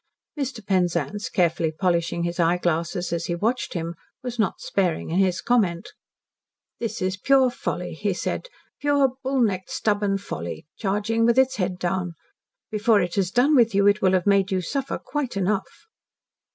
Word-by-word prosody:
Mr. 260 -7 -4
Penzance, 180 -1 0
carefully 165 -2 +1
polishing 170 0 0
his 170 +1 -3
eyeglasses 175 +1 0
as 170 0 -2
he 175 - -1
watched 225 +7 -1
him, 165 0 -3 0.3
was 245 -2 -5
not 215 - +1
sparing 180 -5 -1
in 175 - +1
his 185 -2 +2
comment. 205 -9 +1 0.9
"That 230 -5 -3
is 185 0 -1
pure 265 +4 +4
folly," - - -4
he - - -1
said, - - -3 0.3
"pure 285 -2 +3
bull 265 -1 0
necked, 190 -5 0
stubborn 205 -2 0
folly, 85 - -6
charging 210 +3 0
with 235 +1 +3
its 265 0 +3
head 185 -1 -1
down. 180 -1 -2 0.6
Before 215 0 +3
it 175 -2 -1
has 195 -3 +1
done 255 +8 +3
with 230 -5 +4
you 200 0 +4
it 205 +1 +4
will 190 -1 +3
have 185 -2 +2
made 200 -1 +3
you 190 - +1
suffer 270 +10 -2
quite 280 -8 -4
enough." 195 +1 0
195 Hz, 165 wpm, -24 LUFS, 175-230 Hz, 0.9 s, pure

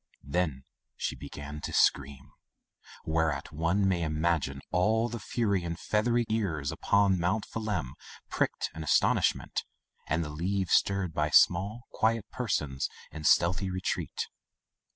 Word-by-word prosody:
Then 70 -3 -1 0.3
she - - -2
began 75 +1 -8
to - - -4
scream, 70 -1 +1 0.7
whereat 80 -3 0
one 85 +6 +1
may 90 -3 +1
imagine 75 -3 0
all 110 +6 +2
the 120 0 -5
furry 100 -7 0
and 85 -1 -4
feathery 120 +3 +1
ears 85 -11 -1
upon 100 -2 +2
Mount 90 +6 0
Phelim 100 - -3 0.3
pricked - - -1
in 80 - -6
astonishment, 75 - +2 0.4
and 80 +1 +1
the 75 - -5
leaves 90 +4 -1
stirred 100 -4 +2
by 75 -1 0
small, 100 +10 +4
quiet 110 -1 +1
persons 80 - -1 0.2
in 75 +1 -7
stealthy 95 +5 +3
retreat. 95 0 -2
85 Hz, 130 wpm, -29 LUFS, 75-100 Hz, 0.7 s, small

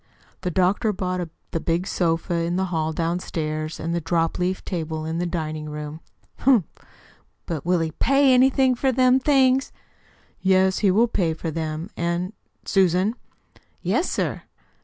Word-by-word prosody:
"The 180 - -1
doctor 185 +5 +2
bought 185 -3 -3 0.2
the 165 - -1
big 170 +2 -1
sofa 170 -2 0
in 170 +1 0
the 190 +1 +1
hall 160 -1 0
downstairs, 160 -2 -3
and 165 +1 -2
the 170 - -1
dropleaf 170 +3 -1
table 160 -3 -3
in 160 +1 -2
the 175 - -1
dining 155 -3 -4
room." 150 +1 -6 0.4
"Humph! 245 -9 +4 0.8
But 165 -1 -4
will 180 -1 +3
he 160 -1 -1
PAY 275 - +3
anything 260 +1 +4
for 265 +2 +1
them 255 +1 +4
things?" 265 -1 +3 0.7
"Yes, 190 0 +3
he 205 - +3
will 220 +6 +4
pay 175 -7 0
well - - -11
for 165 - -3
them. 160 +3 -4
And 170 +3 -2 0.3
Susan." 190 +2 +2 0.7
"Yes, - - +1
sir." - - -2
175 Hz, 155 wpm, -23 LUFS, 165-205 Hz, 0.8 s, Humph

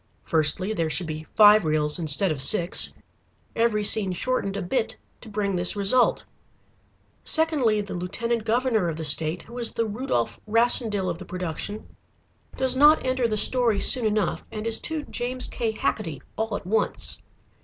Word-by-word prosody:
Firstly 165 +6 0
there 165 -6 -2
should 175 +3 +1
be 155 0 -7
five 210 -1 +7
reels 155 +1 0
instead 165 +3 +1
of 145 -3 -4
six, 175 +4 +3 0.6
every 225 -2 +1
scene 205 -2 +3
shortened 200 0 -2
a - - -3
bit 225 +5 -2 0.2
to 225 - -12
bring 200 -2 -2
this 180 +3 +1
result. 205 +5 +2 1.0
Secondly, 290 -10 +2
the 200 - -7
lieutenant 225 +6 -3
governor 225 -4 0
of 160 - -5
the 160 - -5
state, 155 +3 +2
who 240 +1 -10
is 235 - -1
the 230 - 0
Rudolf 210 - -3
Rassendyll 225 -3 +2
of 170 -1 -4
the 185 - -9
production, 180 +4 -6 0.6
does 260 -1 +1
not 295 +2 +5
enter 255 -2 0
the 215 -1 -2
story 235 -2 +3
soon 240 +2 +4
enough, 215 -1 -1
and 215 -1 -6
is 230 -1 0
too 315 -2 -3
James 250 -1 -4
K. 230 -2 -3
Hacketty 170 -9 -3
all 220 -1 -3
at - - -7
once. 220 +4 -2
210 Hz, 165 wpm, -24 LUFS, 180-235 Hz, 1.0 s, five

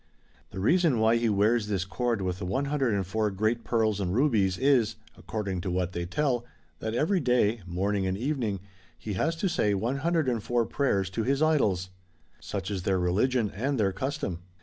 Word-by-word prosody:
The 95 - -7
reason 160 - +3
why 110 +1 +4
he 115 -1 +1
wears 105 +2 +2
this 95 -4 -1
cord 110 +2 -1
with 90 0 -2
the 95 - -4
104 110 -5 0
great 110 +4 0
pearls 110 -3 +1
and 95 -1 -1
rubies, 110 -9 +2
is 125 -5 +3 0.2
(according 100 -5 -4
to 90 - -3
what 90 0 -1
they 85 -1 -4
tell) 125 +3 0 0.4
that 110 +1 -3
every 180 +9 +2
day, 120 -5 +2
morning 95 +2 0
and 95 0 -1
evening, 115 -6 -2 0.4
he 105 +6 -5
has 160 - 0
to 180 +4 -1
say 105 - +1
104 125 - 0
prayers 100 -10 0
to 105 - -2
his 135 +6 +1
idols. 100 - +2 0.5
Such 95 - -5
is 95 -2 -2
their 95 +1 +1
religion, 105 +6 +1
and 130 +5 -2
their 100 -2 +2
custom. 130 - -3
110 Hz, 170 wpm, -28 LUFS, 95-130 Hz, 0.5 s, why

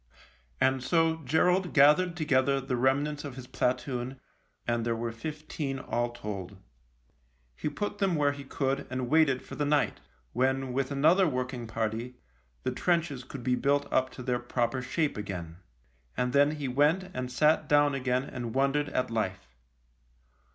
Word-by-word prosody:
And 130 -1 +2
so 165 +2 +2
Gerald 180 +6 +2
gathered 150 +5 +5
together 140 -3 +2
the 135 -1 -2
rem 130 +3 +3
nants 150 -1 -5
of 140 -4 -7
his 130 -2 -8
platoon, 125 0 -2 0.5
and 120 -1 0
there 115 0 0
were 115 0 -3
fifteen 150 +2 -5
all 120 -2 -1
told. 100 -5 -6 1.0
He 150 - -2
put 205 +6 -4
them 195 -3 +2
where 145 -2 +3
he 140 0 -8
could 135 0 -2
and 130 0 -3
waited 150 -5 +4
for - - -11
the 150 - -1
night, 145 -5 +1 0.3
when, 130 +1 0
with 135 0 0
another 160 +7 +4
working 125 -3 -3
party, 115 +2 -3 0.5
the - - 0
trenches 170 -7 0
could 130 0 -9
be 125 - +1
built 140 +3 +2
up 130 0 +3
to 125 - -8
their 125 -1 0
proper 120 +1 -1
shape 145 +3 -1
again. 90 -5 -6 0.6
And 125 0 0
then 145 +2 +4
he 145 -2 -4
went 150 +8 +2
and 130 0 -4
sat 150 +3 +3
down 145 -1 +4
again 130 -1 0
and 120 -4 -6
wondered 140 +2 +2
at 125 - -1
life. 95 - -2
135 Hz, 165 wpm, -29 LUFS, 125-150 Hz, 1.0 s, gathered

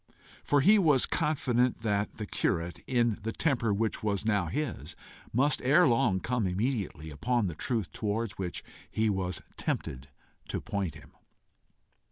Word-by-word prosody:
For 145 -1 +3
he 205 +8 +6
was 150 -8 +4
confident 130 -7 +1
that 105 -2 -1
the 105 - -4
curate, 85 -3 -1
in 120 -3 +1
the 110 +2 -3
temper 120 -5 +1
which 110 +2 0
was 105 -1 -1
now 100 -6 +2
his, 110 - -3 0.4
must 135 +5 +2
ere 150 +7 +5
long 115 -6 +3
come 120 -1 0
immediately 95 - -2
upon 120 - 0
the 85 - -2
truth 110 - -2
towards 110 0 -2
which 90 -3 -3 0.3
he 110 -1 +1
was 95 -2 -2
tempted 65 +1 -3 0.4
to - - -2
point 100 -7 -3
him. - - -14
110 Hz, 150 wpm, -30 LUFS, 95-125 Hz, 0.4 s, he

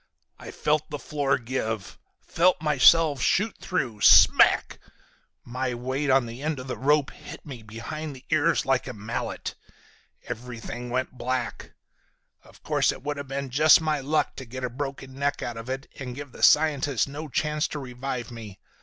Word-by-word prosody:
"I - - -9
felt 155 0 0
the 150 - -4
floor 145 -1 0
give, 115 -4 -4 0.2
felt 180 +1 +2
myself 150 0 +5
shoot 200 - +1
through. 125 - -2
Smack! - - +6 0.7
My 125 +1 -3
weight 130 +4 -2
on 135 -1 +4
the 115 +3 -8
end 155 0 -2
of 130 - -7
the 130 - -4
rope 145 +1 +2
hit - - -11
me 130 -6 -8
behind 125 +8 -7
the 130 - -15
ears - - +2
like - - +1
a - - -5
mallet. 110 +3 -4 0.7
Everything 120 0 -7
went 130 +1 -1
black. 125 -1 -3 0.7
Of - - -20
course - - +2
it - - -10
would 145 0 -3
have 140 -1 -6
been 135 -1 -4
just 150 +3 +6
my 155 -2 0
luck 150 +2 0
to 130 - -7
get 130 +2 -8
a 125 - -2
broken 135 0 -6
neck 140 +2 -2
out 120 - -4
of 115 +2 -8
it 135 +1 -4
and 125 -2 -6
give 145 -1 -8
the - - -12
scientist 145 -4 +4
no 150 +3 -7
chance 150 +3 0
to - - -6
revive 125 -2 -5
me. 110 -5 -10
135 Hz, 175 wpm, -26 LUFS, 125-150 Hz, 0.7 s, Smack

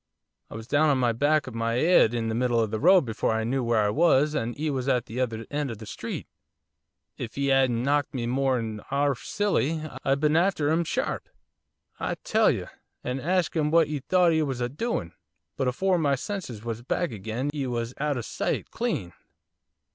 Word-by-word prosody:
I - - -9
was 115 0 -7
down 145 +5 +3
on 135 -3 +2
the 120 -2 +2
back 145 +5 +2
of 130 - -8
my 115 +1 -1
'ead 155 -6 +4
in 115 -1 -1
the 110 - -1
middle 120 0 +1
of 110 -2 0
the 110 - -2
road 180 - +6
before 110 -1 -1
I 110 0 0
knew 130 +3 -1
where 115 -2 +2
I 105 - +1
was 150 0 +3
and 120 -2 -3
'e 155 0 0
was 130 -1 -2
at 125 -3 +2
the 115 +3 -6
other 115 -3 -2
end 145 -1 -1
of 115 - -5
the 110 - -10
street. - - -6 0.9
If 115 +1 -6
'e 140 0 +1
'adn't 130 -3 +3
knocked 145 +1 +1
me 120 -2 -2
more'n 120 -4 0
'arf 140 -1 0
silly 165 -7 0 0.2
I'd 135 +1 +1
been 150 +1 +2
after 165 -4 +2
'im, 165 +2 +2
sharp, - - -2 0.7
I - - -2
tell - - +3
you! - - -1 0.4
and 125 +2 -2
hasked 180 +5 0
'im 150 -2 +1
what 160 -1 +4
'e 150 -1 -2
thought 175 +5 +3
'e 160 - +2
was 135 -5 -2
a 120 0 -1
doin' 145 - -2
of, 90 - -32 0.4
but 135 - -1
afore 180 +8 +1
my 140 -3 +2
senses 130 - -6
was 115 -1 -4
back 170 +6 -1
agin 115 +6 -3
'e 140 -3 -2
was 120 0 -3
out 145 -1 0
o' - - -2
sight, 110 - -3
clean! 150 - -2
135 Hz, 215 wpm, -26 LUFS, 115-155 Hz, 0.9 s, road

